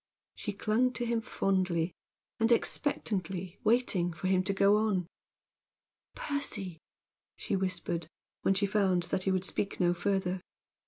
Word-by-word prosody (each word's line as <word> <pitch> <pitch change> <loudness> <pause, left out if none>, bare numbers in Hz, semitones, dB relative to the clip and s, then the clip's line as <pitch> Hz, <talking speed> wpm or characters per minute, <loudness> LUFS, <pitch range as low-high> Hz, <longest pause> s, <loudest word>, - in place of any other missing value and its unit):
She 210 - -4
clung 225 +5 +1
to 240 0 -2
him 230 -1 0
fondly, 185 -6 0 0.5
and 225 +1 +3
expectantly, 190 - 0
waiting 210 -6 +2
for 160 - -7
him 185 0 +3
to 200 - +1
go 200 +1 +5
on. 210 -5 +1 1.1
"Percy!" 200 - -2 0.6
she - - -2
whispered, 180 -3 -1 0.3
when 195 - +3
she 200 +1 +2
found 190 -3 +2
that 185 +1 -2
he 190 - +2
would 185 0 0
speak 200 +1 -2
no 175 -1 +4
further. 185 0 -1
195 Hz, 140 wpm, -31 LUFS, 180-215 Hz, 1.1 s, go